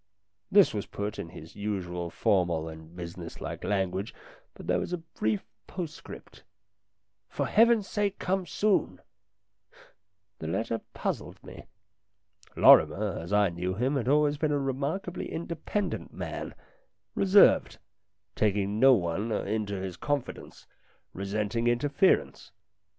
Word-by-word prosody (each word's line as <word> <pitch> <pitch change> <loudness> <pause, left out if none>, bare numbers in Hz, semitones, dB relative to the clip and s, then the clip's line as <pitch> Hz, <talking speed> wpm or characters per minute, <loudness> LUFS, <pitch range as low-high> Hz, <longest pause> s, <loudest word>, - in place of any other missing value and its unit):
This 200 -2 +6
was 105 -2 -3
put 100 +1 -5
in 85 - -5
his 80 -2 -12
usual 90 -4 -3
formal 85 -5 +1
and 80 +1 -11
business 85 -1 -8
like - - -6
language, 95 0 -1 0.4
but - - -11
there - - +1
was - - -4
a - - 0
brief 110 - -3 0.2
postscript 170 -4 -8 0.9
"For - - -2
Heaven's 225 -2 +4
sake 205 -1 -1
come 190 -1 -1
soon! 210 +2 0 0.7
" 100 +1 -28
The 80 - -5
letter 115 +7 -2
puzzled - - -4
me. - - -11 0.9
Lorrimer, 105 -2 +5
as 85 +3 -8
I 105 -1 +4
knew 90 +2 -3
him, 130 +7 0
had 125 -3 -1
always 145 +1 +3
been 155 -1 +1
a 145 - +2
remarkably 140 +7 -3
independent 170 +5 -3
man, - - -6 0.6
reserved, 195 - +5 0.6
taking 105 0 0
no 135 +1 +7
one 95 +3 -2
into 105 -1 -2
his 95 -2 -5
confidence, 145 -3 -4 0.5
resenting 105 +4 -2
interference. 120 - +1
105 Hz, 125 wpm, -28 LUFS, 95-150 Hz, 0.9 s, no